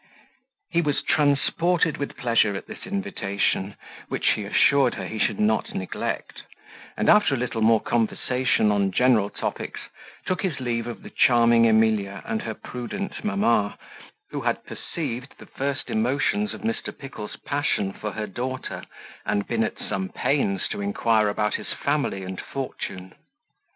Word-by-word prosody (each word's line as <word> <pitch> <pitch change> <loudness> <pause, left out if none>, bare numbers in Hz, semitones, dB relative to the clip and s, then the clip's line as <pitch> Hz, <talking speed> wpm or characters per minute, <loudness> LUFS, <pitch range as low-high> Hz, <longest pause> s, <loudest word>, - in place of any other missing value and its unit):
He 170 - +3
was 145 -4 0
transported 155 +3 +2
with 140 - -4
pleasure 115 -4 +3
at - - -5
this - - -9
invitation, 100 - -1 0.3
which - - +1
he 105 - -1
assured 135 +5 +4
her - - -4
he 110 - -5
should 105 - +1
not 110 +1 +1
neglect; 95 -1 -3 0.6
and - - 0
after 210 -9 +6
a - - -2
little 120 -2 -2
more 110 0 +5
conversation 120 0 +1
on 100 -1 +2
general 115 -2 +4
topics, - - -4 0.5
took 185 - -1
his 175 -8 -1
leave 120 -2 -1
of 120 - -7
the - - -10
charming 115 -1 +5
Emilia 110 -3 +2
and 110 - -1
her 110 -1 -4
prudent 125 - -5
mamma, 195 - +2 0.5
who - - -3
had - - -1
perceived 125 +3 -5
the - - -12
first 140 0 -3
emotions 140 - +1
of - - -10
Mr. 225 +1 -3
Pickle's 120 -7 -7
passion 140 -9 -1
for 105 -1 -5
her 110 - -3
daughter, 125 +6 -4 0.4
and 100 -1 0
been 115 -1 +1
at 110 - -3
some 95 -1 -3
pains 100 -9 0
to - - -3
inquire 105 +2 +2
about 105 0 0
his - - -3
family 140 -9 -1
and 95 0 -5
fortune. 95 -8 -6
115 Hz, 155 wpm, -25 LUFS, 105-140 Hz, 0.6 s, after